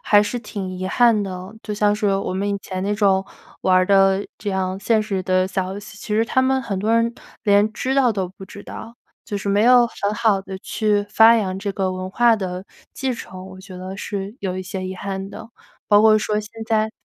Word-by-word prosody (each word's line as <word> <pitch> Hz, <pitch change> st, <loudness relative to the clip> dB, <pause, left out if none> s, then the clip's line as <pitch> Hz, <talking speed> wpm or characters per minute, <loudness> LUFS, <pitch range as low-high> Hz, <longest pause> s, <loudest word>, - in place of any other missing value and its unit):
还 205 Hz, 0 st, +5 dB
是 245 Hz, +4 st, -3 dB
挺 200 Hz, -5 st, -6 dB
遗 185 Hz, +1 st, -4 dB
憾 230 Hz, +1 st, +4 dB
的。 185 Hz, +2 st, -7 dB
就 210 Hz, -, -5 dB
像 205 Hz, 0 st, +2 dB
是 210 Hz, 0 st, -1 dB
我 195 Hz, -1 st, -2 dB
们 200 Hz, +2 st, -1 dB
以 200 Hz, 0 st, -1 dB
前 185 Hz, -1 st, -5 dB
那 205 Hz, +1 st, 0 dB
种 195 Hz, -2 st, +2 dB, 0.4 s
玩 185 Hz, -1 st, +3 dB
儿 185 Hz, 0 st, +3 dB
的 195 Hz, 0 st, +4 dB
这 205 Hz, -, -4 dB
样 190 Hz, 0 st, -2 dB
现 220 Hz, +1 st, +2 dB
实 195 Hz, -3 st, -2 dB
的 185 Hz, 0 st, +2 dB
小 190 Hz, -1 st, -2 dB
游 200 Hz, -, -6 dB
戏， 205 Hz, 0 st, -11 dB
其 210 Hz, -, -11 dB
实 225 Hz, +1 st, +3 dB
他 260 Hz, +3 st, +1 dB
们 265 Hz, 0 st, +2 dB
很 200 Hz, -6 st, -3 dB
多 215 Hz, +4 st, 0 dB
人 230 Hz, 0 st, +2 dB, 0.3 s
连 205 Hz, +1 st, +4 dB
知 260 Hz, +5 st, -2 dB
道 255 Hz, -4 st, +4 dB
都 190 Hz, -3 st, -2 dB
不 190 Hz, +1 st, -12 dB
知 200 Hz, +1 st, -11 dB
道， 230 Hz, +1 st, -9 dB, 0.3 s
就 205 Hz, -3 st, -4 dB
是 200 Hz, -, -4 dB
没 200 Hz, +2 st, +3 dB
有 245 Hz, 0 st, +6 dB
很 205 Hz, -2 st, -3 dB
好 220 Hz, -3 st, +2 dB
地 190 Hz, -1 st, -7 dB
去 210 Hz, 0 st, 0 dB
发 225 Hz, +2 st, +6 dB
扬 190 Hz, -4 st, -1 dB
这 200 Hz, +1 st, -3 dB
个 190 Hz, -1 st, -1 dB
文 185 Hz, 0 st, -5 dB
化 235 Hz, +2 st, +4 dB
的 185 Hz, -2 st, -4 dB, 0.3 s
继 265 Hz, -2 st, -2 dB
承， 185 Hz, -4 st, -9 dB
我 185 Hz, 0 st, -11 dB
觉 190 Hz, -1 st, -11 dB
得 185 Hz, +1 st, -7 dB
是 200 Hz, +1 st, -5 dB
有 185 Hz, -1 st, -3 dB
一 -, -, -4 dB
些 185 Hz, 0 st, -5 dB
遗 185 Hz, 0 st, -4 dB
憾 195 Hz, +1 st, -5 dB
的。 225 Hz, 0 st, -10 dB, 0.4 s
包 205 Hz, -1 st, +6 dB
括 215 Hz, -1 st, +6 dB
说 210 Hz, 0 st, -1 dB
现 210 Hz, 0 st, -11 dB, 0.2 s
在 220 Hz, -1 st, +1 dB
200 Hz, 255 characters per minute, -21 LUFS, 190-220 Hz, 0.4 s, 有